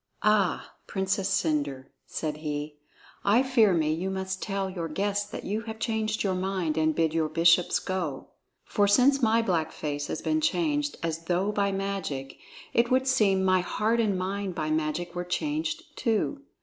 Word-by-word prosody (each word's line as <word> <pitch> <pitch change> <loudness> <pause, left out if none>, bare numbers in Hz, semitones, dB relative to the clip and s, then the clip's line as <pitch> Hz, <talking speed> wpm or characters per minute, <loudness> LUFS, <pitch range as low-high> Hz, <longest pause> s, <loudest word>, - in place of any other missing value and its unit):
"Ah, 210 -4 +2
Princess 190 0 -1
Cendre," 145 -7 0 0.2
said 150 -2 -3
he, 150 -1 -4 0.5
"I 220 +6 +4
fear 245 -6 +4
me 155 -3 +2
you 175 +4 -2
must 190 0 -3
tell 195 -2 -2
your 180 -3 -4
guests 205 +5 -1
that - - -6
you 210 +3 -2
have 220 - -5
changed 220 -1 -1
your 195 -2 +1
mind 185 -3 -1
and 155 -1 +2
bid 160 -1 +1
your 160 -1 +1
bishops 170 +2 +4
go. 180 -8 -3 0.4
For 205 -1 +2
since 260 +7 +4
my 225 0 +3
black 170 -7 0
face 145 -1 -4
has - - -4
been 315 0 +1
changed 295 -2 0
as 165 0 -3
though 185 +4 +1
by 200 -1 +1
magic, 195 -9 -4 0.3
it 235 0 +3
would 260 +1 +3
seem 210 -8 +3
my 185 0 +4
heart 220 +5 0
and 210 -4 +2
mind 190 0 -3
by 155 -3 -2
magic 160 +3 -1
were 175 0 -3
changed 310 - -2
too. 230 +5 0
190 Hz, 175 wpm, -27 LUFS, 165-215 Hz, 0.5 s, I